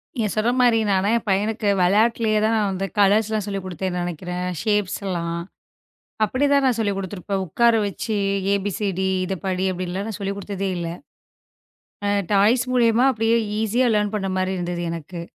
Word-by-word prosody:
நீங்க 225 -4 0
சொல்ற 220 +3 +2
மாரி, 240 -2 +4
நான்லாம் 190 +1 +2
என் 235 - -6
பையனுக்கு 210 +3 0
விளையாட்டிலேயே 215 +3 +3
தான் 225 +1 +2
நான் 205 -2 +1
அந்த 190 +1 -2
கலர்ஸ்லாம் 210 +1 +3
சொல்லிக் 195 -2 -4
கொடுத்தேன்னு 185 0 -3
நினைக்கிறேன். 180 +1 -4 0.2
ஷேப்ஸ் 210 -3 0
எல்லாம். 170 -2 -2 0.9
அப்படி 255 +6 0
தான் 280 - +4
நான் 250 -3 +2
சொல்லிக் 205 -3 0
கொடுத்திருப்பேன். 195 0 -3
உட்கார 235 +7 +3
வச்சு, 210 +2 -3 0.4
"ஏ-பி-சி-டி. 195 -1 -1 0.2
இதைப் 190 -2 -5
படி" 185 0 0
அப்படின்லாம் 185 +2 -4
நான் 215 - -5
சொல்லிக் 200 0 -3
கொடுத்ததே 195 -1 -3
இல்லை. 170 -1 -3 1.1
அ - - +1 0.2
டாய்ஸ் 220 +5 +4
மூலியமா 235 -1 +4
அப்படியே 225 -1 +1 0.3
ஈசியா 235 +4 +2
லேர்ன் 210 0 0
பண்ற 195 -2 -2
மாரி 185 0 0
இருந்தது 175 -1 -3
எனக்கு. 170 +1 -6
200 Hz, 160 wpm, -22 LUFS, 185-220 Hz, 1.1 s, மாரி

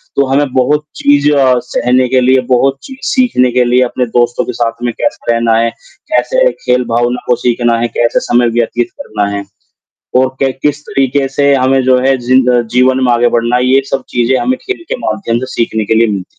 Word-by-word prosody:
तो 140 - +2
हमें 140 +2 +1
बहुत 150 +4 +1
चीज़ 145 +1 +2
अ, 135 -3 +3
सहने 125 +1 0
के 130 0 +2
लिए, 130 +1 +3
बहुत 135 +2 +2
चीज़ 265 -1 -11
सीखने 235 - +2
के 125 +1 +2
लिए 125 +1 +2
अपने 125 0 -2
दोस्तों 120 +1 0
के - - -5
साथ 115 -1 +1
में 120 -1 -1
कैसे 115 - -1
रहना 115 -1 +1
है, 115 +1 +1 0.4
कैसे - - +2
खेल 125 0 +2
भावना 120 +1 0
को 125 - +3
सीखना 120 -1 +1
है, 120 - 0
कैसे 120 0 +2
समय 120 0 +1
व्यतीत 120 +1 -1
करना 105 -1 -3
है, 100 - -4 0.8
और 130 - +2
क 135 -1 +1
किस 145 0 0
तरीके 135 +1 0
से 140 +1 +2
हमें 130 0 +2
जो 130 0 +3
है, 135 +1 +2
जी 125 +1 +1 0.4
जीवन 130 +1 +3
में 125 - +2
आगे 120 0 +2
बढ़ना 120 +1 0
है, 125 - 0
ये 130 +1 +4
सब 135 - -1
चीज़ें 120 +2 0
हमें 255 +1 0
खेल 390 -3 -5
के - - -2
माध्यम 115 -12 -2
से 130 - -4
सीखने 110 -2 -1
के 110 - 0
लिए 115 +1 +3
मिलती 100 -2 -1
है 90 - -11
125 Hz, 215 wpm, -12 LUFS, 120-135 Hz, 0.8 s, ये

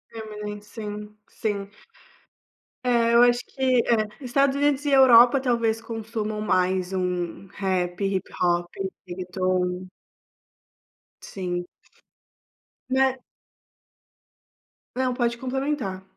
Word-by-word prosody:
Eminem 210 -2 -6
sim, 210 0 -8
sim. 200 -3 -3 1.1
É, 235 -2 +3
eu 235 +1 +7
acho 245 0 +4
que 260 -2 +1
é, 220 -2 +2 0.2
Estados 275 +2 +2
Unidos 285 0 +1
e 285 - +1
Europa 260 -1 +7
talvez 230 -3 +1
consumam 220 -1 -4
mais 185 -2 +1
um 180 0 -2
rap, 185 -2 -2
hip-hop, 175 -2 0 0.4
reggaeton. 185 0 -2 1.3
Sim. 175 -2 -4 1.3
É 265 0 +2 1.8
Não, 255 -1 0
pode 235 -2 0
complementar. 260 -7 -3
215 Hz, 90 wpm, -25 LUFS, 185-250 Hz, 1.8 s, eu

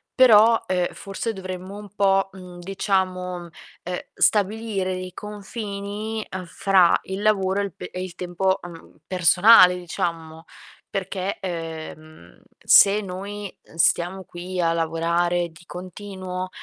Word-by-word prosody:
però, 230 -3 +6
uhm, 180 -1 +1
forse 200 +3 -4
dovremmo 185 +1 -7
un 205 -1 -10
po', 195 -1 +2
mhmm, 180 -2 -11
diciamo, 185 -1 -1
uhm, 170 - -12 0.6
stabilire 205 -2 +1
dei 185 -1 -6
confini, 210 +1 -6
uhm, 185 -1 -5
fra 185 0 +3
il 190 +1 -5
lavoro 200 -2 +2
e - - 0
il 190 - -7
pe - - -8
e 185 0 -4
il 180 -2 -8
tempo, 190 +2 -1
mhmm, 170 -2 -12
personale, 180 +1 +6
diciamo. 165 -2 -4 0.5
Perché, 195 0 -3
ehm, 160 - -8 0.2
se 205 +1 +6
noi 200 +1 -7 0.2
stiamo 175 +3 +2
qui 180 +2 -7
a 165 0 +2
lavorare 170 +1 0
di 160 +1 -17
continuo, 185 0 -6
185 Hz, 125 wpm, -23 LUFS, 175-200 Hz, 0.6 s, però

